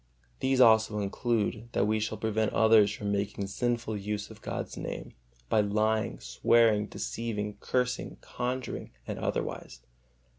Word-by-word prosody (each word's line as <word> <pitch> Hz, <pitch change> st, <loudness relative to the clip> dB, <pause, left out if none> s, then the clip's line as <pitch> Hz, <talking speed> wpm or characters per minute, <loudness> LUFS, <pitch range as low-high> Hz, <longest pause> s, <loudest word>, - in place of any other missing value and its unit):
These 130 Hz, 0 st, +1 dB
also 110 Hz, -3 st, +6 dB
include, 110 Hz, +2 st, -1 dB
that -, -, +2 dB
we 110 Hz, +1 st, +1 dB
shall 110 Hz, 0 st, -2 dB
prevent 110 Hz, 0 st, 0 dB
others 110 Hz, -2 st, +5 dB
from 100 Hz, -1 st, -3 dB
making 100 Hz, 0 st, -1 dB
sinful 115 Hz, +2 st, -1 dB
use 105 Hz, 0 st, -4 dB
of -, -, -13 dB
God's -, -, -4 dB
Name -, -, -6 dB, 0.3 s
by 105 Hz, -, +3 dB
lying, 105 Hz, -, 0 dB
swearing, 105 Hz, -, +3 dB
deceiving, 105 Hz, -3 st, -4 dB
cursing, 125 Hz, 0 st, -1 dB
conjuring, 125 Hz, +1 st, -4 dB, 0.2 s
and -, -, -5 dB
otherwise. 60 Hz, -1 st, -3 dB
110 Hz, 135 wpm, -29 LUFS, 105-115 Hz, 0.3 s, also